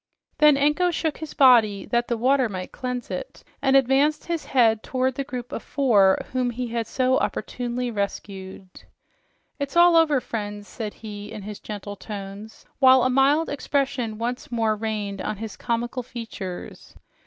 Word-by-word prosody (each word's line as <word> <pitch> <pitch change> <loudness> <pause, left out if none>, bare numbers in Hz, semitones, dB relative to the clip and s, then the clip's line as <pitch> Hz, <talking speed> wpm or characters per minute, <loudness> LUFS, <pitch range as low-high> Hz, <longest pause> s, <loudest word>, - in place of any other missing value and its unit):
Then 300 -2 +6
Anko 300 +6 +2
shook 320 -3 -2
his 315 - -7
body 225 -7 +5
that 240 0 0
the 235 - -1
water 260 +1 +2
might 185 -2 -6
cleanse 250 -4 -5
it, 180 - -6 0.2
and 270 -1 +3
advanced 275 +3 +3
his 335 -2 -3
head 225 -4 +3
toward 260 +1 -1
the 275 - -3
group 250 -2 -7
of - - -4
four 210 -9 +3
whom 255 -1 0
he 245 0 -4
had 230 -1 -2
so 255 +1 +2
opportunely 245 0 -3
rescued. 195 -2 -5 0.9
"It 280 -1 -2
is - - -14
all 345 0 +7
over, 310 -4 +4
friends," 205 -4 -5
said 215 -3 -6
he 210 -1 -8
in 215 -3 -7
his 210 0 -7
gentle 205 -1 -7
tones, 205 +1 -9
while 260 -2 +7
a 255 - +2
mild 280 +5 +3
expression 270 -6 -1
once 245 +2 -4
more 225 -2 +1
reigned 210 -2 -3
on 210 - -3
his 220 0 -6
comical 240 +2 -2
features. 225 -7 -8
240 Hz, 165 wpm, -24 LUFS, 210-270 Hz, 0.9 s, all